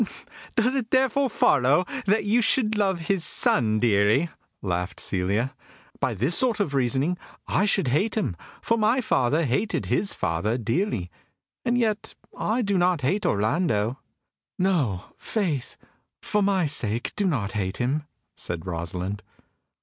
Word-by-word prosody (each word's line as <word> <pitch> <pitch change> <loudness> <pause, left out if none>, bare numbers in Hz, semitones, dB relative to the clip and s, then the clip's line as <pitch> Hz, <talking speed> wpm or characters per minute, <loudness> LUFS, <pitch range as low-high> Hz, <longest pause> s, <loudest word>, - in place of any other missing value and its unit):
"Does 245 +1 +2
it 255 -5 -2
therefore 265 +1 +2
follow 145 - +3 0.2
that 210 +3 +3
you 225 +4 +3
should 225 -1 +2
love 195 -4 +1
his 180 +1 0
son 110 -9 +3
dearly?" 110 +7 +3 0.3
laughed 90 -1 -2
Celia. 100 +8 -1 0.5
"By - - 0
this 130 - +1
sort 245 -4 +2
of 165 -9 0
reasoning 140 +7 +1 0.3
I 200 - +2
should 195 -8 +2
hate 175 - +1
him, 155 - -1 0.3
for 230 0 +1
my 220 +4 +3
father 150 - +1
hated 145 - 0
his 200 - 0
father 85 +8 -1
dearly. 115 - -1 0.5
And 245 -1 +1
yet 220 -3 -1 0.2
I 235 +3 0
do 200 -3 +1
not 175 -3 +2
hate 190 +11 0
Orlando." 110 - +1 0.6
"No, 150 - +1 0.2
faith, 170 - -2 0.4
for 210 - 0
my 195 -3 +2
sake 120 -6 -1
do 205 -2 +1
not 115 - -1
hate 95 -3 -2
him!" 140 +5 -1 0.3
said 85 0 -4
Rosalind. 90 +3 -4
150 Hz, 140 wpm, -25 LUFS, -, 0.6 s, follow